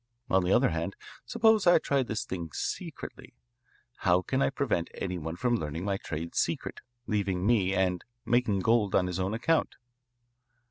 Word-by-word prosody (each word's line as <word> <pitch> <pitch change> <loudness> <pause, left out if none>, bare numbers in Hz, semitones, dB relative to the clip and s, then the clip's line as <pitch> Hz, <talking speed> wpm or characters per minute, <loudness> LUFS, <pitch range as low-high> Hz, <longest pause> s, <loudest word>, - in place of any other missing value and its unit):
On 95 -1 +4
the 90 - 0
other - - +4
hand, 85 +4 -3 0.3
suppose 220 -4 +3
I 175 - +8
try 140 -3 +1
this 115 -1 -3
thing 85 -7 -5
secretly. - - -6 0.6
How 90 +1 +2
can 135 0 -1
I - - +3
prevent 135 -11 -1
any 90 -2 -3
one 80 +1 -5
from 120 +4 +1
learning 80 0 -4
my 100 -1 0
trade 85 -2 -5
secret, - - -2 0.2
leaving 100 -4 -1
me, 100 -4 +3
and 90 -2 +1 0.2
making 115 -5 +2
gold 110 -2 +2
on 90 - +4
his 90 0 -3
own 95 +3 -1
account? 160 +8 +1
95 Hz, 170 wpm, -29 LUFS, 90-120 Hz, 0.6 s, I